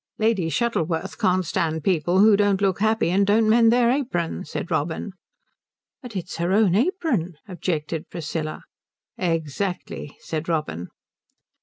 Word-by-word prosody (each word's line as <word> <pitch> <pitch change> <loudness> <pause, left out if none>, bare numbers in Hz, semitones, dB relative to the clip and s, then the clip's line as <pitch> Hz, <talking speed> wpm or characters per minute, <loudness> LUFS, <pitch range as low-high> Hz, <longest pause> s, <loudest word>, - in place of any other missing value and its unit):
"Lady 215 -7 +1
Shuttleworth 170 -6 -1
can't 185 0 +2
stand 160 -2 -1
people 175 +1 +2
who 215 0 +7
don't 200 -1 +2
look 195 -2 +1
happy 220 -4 +2
and 195 +2 +3
don't 215 +2 +4
mend 225 +1 +5
their 240 0 +4
apron," 210 - -1
said 175 - -5
Robin. 160 +6 -1 0.9
"But 245 -5 -10
it's 180 -2 -5
her 170 +2 0
own 205 -3 +4
apron," 235 - 0
objected 165 -4 -3
Priscilla. 155 -1 -4 0.6
"Exactly," 165 -2 -3
said 160 +1 -4
Robin. 90 - -2
185 Hz, 135 wpm, -23 LUFS, 165-215 Hz, 0.9 s, who